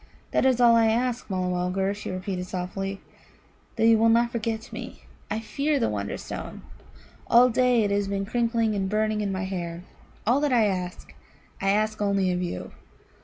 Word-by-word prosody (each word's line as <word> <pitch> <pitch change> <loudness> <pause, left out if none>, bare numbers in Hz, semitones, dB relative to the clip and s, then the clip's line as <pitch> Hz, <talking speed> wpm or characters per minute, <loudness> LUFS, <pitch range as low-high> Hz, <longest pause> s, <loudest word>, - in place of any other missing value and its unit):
"That - - +3
is 255 -2 +2
all 235 -1 +6
I 225 -1 +4
ask, 240 +2 0
Mulla 185 -1 -1
mulgar," 180 +2 0
she 205 - -7
repeated 185 0 -4
softly 195 +2 -4 0.7
"that 225 - +2
you 225 -1 +6
will 225 +1 +4
not 235 +1 +3
forget 225 -1 -3
me. - - -8 0.3
I 215 - -1
fear 280 +6 -1
the - - +1
Wonderstone. 100 -1 -5 0.6
All 245 +1 +6
day 245 -1 +3
it 205 - 0
has 200 0 +1
been 195 0 -2
crickling 230 0 0
and 195 -2 -1
burning 215 +1 0
in 200 -1 -1
my 190 0 -2
hair. 175 -2 -4 0.4
All 245 +5 +3
that 295 -2 +1
I 235 -3 +4
ask, 180 -3 -3 0.5
I 195 - +1
ask 215 +1 +1
only 200 -2 +1
of 180 0 -1
you." 175 - -4
210 Hz, 180 wpm, -26 LUFS, 190-230 Hz, 0.7 s, all